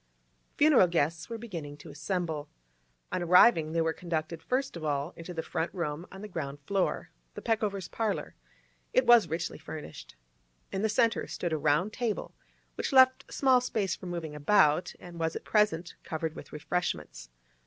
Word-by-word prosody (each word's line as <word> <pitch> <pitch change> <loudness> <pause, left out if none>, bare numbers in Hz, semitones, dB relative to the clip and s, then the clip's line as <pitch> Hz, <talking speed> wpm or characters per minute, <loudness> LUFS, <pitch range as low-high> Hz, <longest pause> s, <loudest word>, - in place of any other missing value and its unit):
Funeral 290 -11 +6
guests 165 +1 0
were 230 - -4
beginning 165 -11 -7
to 145 - -11
assemble. 155 -1 -3 0.6
On 185 - -1
arriving, 175 -2 +6
they 165 0 +1
were 160 0 +1
conducted 165 -1 -4
first 260 +3 -1
of 170 - -7
all 145 +1 -1
into 165 +2 -8
the 165 -2 -4
front 165 0 -2
room 170 -1 -3
on 190 +2 -10
the - - -5
ground 145 -7 -5
floor, 195 -2 -1 0.2
the - - -6
Peckovers' 210 -5 -1
parlour. 220 -3 -2 0.6
It - - +4
was 240 -2 +6
richly 165 0 -3
furnished. 155 - -9 0.6
In 190 - -2
the 220 - +1
centre 230 +1 +2
stood 175 -3 -3
a - - +1
round 155 +8 +2
table, 235 -4 -3 0.4
which - - -3
left 260 -1 +5
small 260 -2 +4
space 205 -7 -1
for 185 - -10
moving 170 -3 -4
about, 150 +1 +3
and 175 -1 -10
was 165 0 -1
at - - -5
present 190 -6 +1
covered 160 0 -3
with - - -10
refreshments. 80 - -3
170 Hz, 170 wpm, -29 LUFS, 155-210 Hz, 0.6 s, Funeral